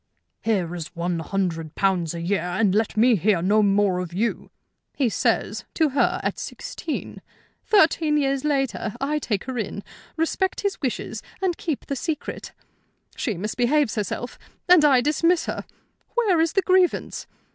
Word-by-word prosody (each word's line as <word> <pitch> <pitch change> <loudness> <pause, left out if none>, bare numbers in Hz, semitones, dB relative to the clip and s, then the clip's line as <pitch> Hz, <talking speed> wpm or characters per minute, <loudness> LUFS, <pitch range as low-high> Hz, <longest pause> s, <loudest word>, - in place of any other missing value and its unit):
'Here 190 -7 0
is 165 -3 -7
one 170 0 -1
hundred 165 -2 -2
pounds 180 -4 +1
a 170 - -4
year, 190 +1 0
and 185 +3 +1
let 215 +1 0
me 235 +2 +5
hear 200 -1 +2
no 210 +3 +4
more 200 -2 +2
of 180 -2 -5
you,' 225 +6 -1 0.5
he 265 -5 +2
says - - 0
to 315 -2 +3
her 275 - +1
at - - -2
sixteen. 320 - -6 0.4
Thirteen 320 -6 +4
years 275 -2 0
later 270 -7 -1
I 295 +3 0
take 210 -8 -2
her 260 -2 -4
in, 205 -1 -4 0.3
respect 370 +4 0
his 400 -3 -2
wishes, 260 -5 -3 0.2
and 375 -2 0
keep 315 -5 -4
the 280 - -3
secret. 305 +2 -4 0.6
She 225 -7 -2
misbehaves 240 - +1
herself, 215 +3 -4 0.3
and 355 -3 +7
I 270 -4 +6
dismiss 330 +5 +2
her. - - -4 0.5
Where 405 -9 +3
is 325 -1 +1
the 390 - +2
grievance? 370 -1 +1
240 Hz, 155 wpm, -24 LUFS, 195-305 Hz, 0.6 s, and